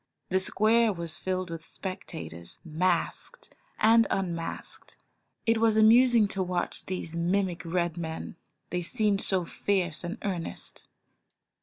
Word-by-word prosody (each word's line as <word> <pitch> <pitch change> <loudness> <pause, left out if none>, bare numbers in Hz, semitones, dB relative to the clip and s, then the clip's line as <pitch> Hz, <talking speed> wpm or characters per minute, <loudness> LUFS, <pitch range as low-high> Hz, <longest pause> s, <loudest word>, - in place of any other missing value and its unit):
The 190 - +3
square 220 +4 +3
was 170 -4 -4
filled 185 -2 -2
with 165 -1 -6
spectators, 165 - -7
masked 170 +2 -1 0.2
and 225 +1 +5
un 190 -3 0
masked. 165 0 -5 0.5
It 225 0 +3
was 225 -1 +3
amusing 230 0 +6
to 195 - -2
watch 180 -1 -2
these 180 -3 -4
mimic 175 0 0
Red 170 0 -1
men, 160 -1 -5 0.4
they 180 - 0
seemed 205 +2 +2
so 185 -3 +1
fierce 180 -3 -1
and 175 +5 -4
earnest. 180 -5 -3
185 Hz, 130 wpm, -28 LUFS, 170-210 Hz, 0.5 s, amusing